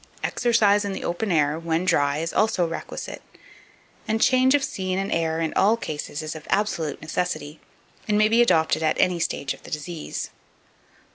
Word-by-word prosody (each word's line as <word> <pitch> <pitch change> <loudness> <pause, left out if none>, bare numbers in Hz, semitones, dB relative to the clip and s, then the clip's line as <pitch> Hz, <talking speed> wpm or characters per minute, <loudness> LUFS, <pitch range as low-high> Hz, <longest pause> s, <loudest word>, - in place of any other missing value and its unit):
Exercise 220 -4 +3
in 200 -1 -3
the - - -5
open 190 +4 -2
air, 150 -1 +2
when 165 +1 -1
dry, 145 -5 +2
is 165 +2 -3
also 210 -5 +2
requisite, 165 - -6 0.9
and 220 0 0
charge 260 +2 +4
of 285 - +1
scene 185 -4 -2
and 195 +1 -2
air 165 -1 0
in 160 -1 -1
all 210 +4 +3
cases 150 -5 -5
is 155 0 -5
of 155 - -10
absolute 190 -8 0
necessity, 155 -2 -3 0.5
and 210 -1 +2
may 215 0 +5
be 230 +2 +4
adopted 160 -10 +3
at 155 -1 +1
any 180 -1 +2
stage 140 -4 -2
of - - -15
the - - -12
disease. 155 +1 -5
175 Hz, 180 wpm, -24 LUFS, 155-210 Hz, 0.9 s, may